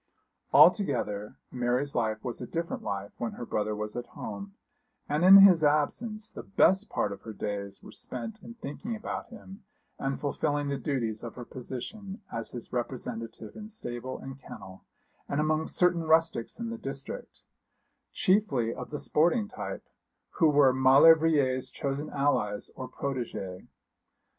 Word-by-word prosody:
Altogether 120 - +4 0.2
Mary's 125 +3 0
life 110 -1 -1
was 125 -1 -5
a 125 - -5
different 170 0 -3
life 100 0 -4
when 120 - -2
her 120 - -6
brother 105 -1 -1
was 105 0 -5
at 120 0 -4
home; 200 0 -6 0.5
and 150 +3 0
in 190 +2 +11
his 190 -5 +8
absence 205 +9 0
the - - -7
best 195 +1 +3
part - - 0
of 100 - -7
her 110 - -8
days 100 -2 -5
were - - -11
spent 220 -1 -7
in 235 - -10
thinking 225 - -5
about 215 - -5
him 210 -3 -12 0.4
and 135 0 -2
fulfilling 145 0 -1
the 140 - -1
duties 115 -7 -2
of 115 - -7
her 120 - -7
position 190 - -7
as 115 0 -4
his 120 -2 -9
representative 120 -3 -5
in 215 0 -8
stable 130 - -6
and 135 0 -9
kennel, 95 -6 -11 0.5
and 140 - 0
among 155 +1 +1
certain 180 -1 +2
rustics 160 - +2
in 230 -1 -3
the 230 - -6
district, 135 -4 -7 0.7
chiefly 140 - +2
of - - -7
the 150 - -4
sporting 175 +10 +2
type, - - -6 0.4
who 160 - +3
were 140 -3 +5
Maulevrier's 135 0 +5
chosen 140 0 -3
allies 140 -8 0
or 130 - -6
protégés. 115 -9 -4
140 Hz, 155 wpm, -29 LUFS, 120-170 Hz, 0.7 s, in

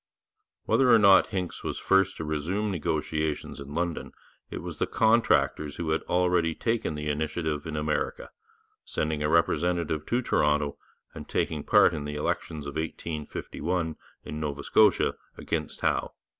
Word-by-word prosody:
Whether 130 -2 +3
or 115 - +8
not 100 -3 +6
Hincks 90 -3 -4
was - - -3
first 95 0 +2
to - - -4
resume 85 +8 -1
negotiations 80 -3 -2
in 70 +1 -8
London, 85 -1 -2 0.4
it - - -6
was - - -7
the - - +1
contractors 110 -9 +2
who 80 -2 -2
had 80 - +1
already 90 -2 +2
taken 115 -9 -1
the 75 0 -4
initiative 75 0 -2
in 80 - -4
America, 75 0 -2 0.5
sending 75 -1 -2
a 75 - +1
representative 85 -1 +1
to 120 +2 0
Toronto, 75 -7 +1 0.3
and - - -9
taking 75 -2 -1
part - - +5
in 75 -2 -4
the 75 0 -4
elections 75 0 -3
of 70 +1 -5
1851 80 +1 -3 0.3
in 75 - -6
Nova 70 -2 -3
Scotia - - +4 0.2
against - - -3
Howe. - - 0
80 Hz, 150 wpm, -27 LUFS, 75-90 Hz, 0.5 s, or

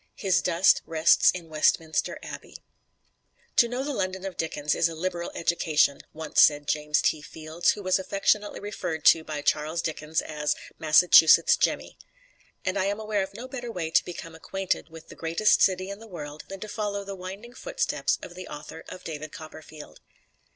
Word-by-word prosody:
His 185 -3 +1
dust 175 +2 +3
rests 160 0 +4
in 175 -2 -3
Westminster 155 0 +1
Abbey. - - -9 1.0
"To 235 - +6
know 245 +3 -3
the 290 +1 -3
London 190 -4 -3
of 195 - -5
Dickens 150 -2 -1
is 165 - +2
a 165 - -7
liberal 175 +1 -3
education," 155 -4 +1
once 160 -1 +1
said 145 -1 +4
James 150 0 +1
T. 155 - +1
Fields, 160 +2 -1
who 205 - -9
was 185 0 +2
affectionately 200 +2 0
referred 175 -6 -5
to 165 - +6
by 150 -2 -5
Charles 155 +3 0
Dickens 160 -1 -2
as 150 -1 -2 0.2
"Massachusetts 165 - +6
Jemmy." - - -1 0.7
And 185 +1 0
I 190 - +1
am 200 +2 -1
aware 215 -2 -1
of 190 0 -5
no 250 +3 -7
better 245 -2 -6
way 165 -6 -4
to - - +4
become 165 -1 -8
acquainted 190 +1 -3
with 160 0 -13
the - - -11
greatest 165 +6 +2
city 185 0 +2
in 200 - -8
the 225 - -12
world 150 -6 -8
than 195 -1 -9
to 215 - -5
follow 205 -1 -3
the 200 0 -6
winding 195 +6 -9
footsteps - - -1
of - - -8
the 185 0 -9
author 150 +2 -9
of 185 - -10
"David 155 -1 -6
Copperfield." 155 -2 -11
170 Hz, 180 wpm, -26 LUFS, 155-195 Hz, 1.0 s, To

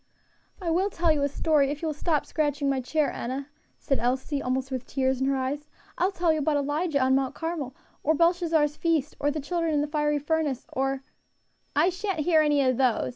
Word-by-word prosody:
"I 345 -4 -2
will 375 +5 +2
tell 340 -3 +2
you 300 -2 +1
a 280 - +2
story 285 -1 +2
if 295 +3 -5
you - - 0
will 310 - -1
stop 300 0 0
scratching 290 -2 -1
my 270 -1 +1
chair, 300 +3 0
Enna," 270 +4 -4 0.3
said 275 - -1
Elsie, 260 +4 -1
almost 260 +1 -2
with 255 -1 -4
tears 265 -1 0
in 265 - +2
her 275 - +2
eyes, 275 +3 -2 0.3
"I - - +1
will 385 - +1
tell 345 -4 +2
you 310 - -1
about 295 0 +1
Elijah 290 +2 0
on 260 0 +3
Mount 265 -1 +1
Carmel 325 -6 -4 0.3
or 315 +2 +2
Beishazzar's 330 -3 +2
feast, 315 -4 0
or 290 - +1
the 300 +1 -2
children 330 +1 -1
in 290 - +2
the 295 - -1
fiery 295 0 +1
furnace, 290 -2 -1
or 270 0 -1 0.4
" - - -44 0.3
"I 310 +5 +4
sha'n't 375 -2 -2
hear 315 0 +4
any 295 -2 +3
of 255 -2 +2
those! 250 - +2
295 Hz, 225 wpm, -27 LUFS, 270-320 Hz, 0.4 s, I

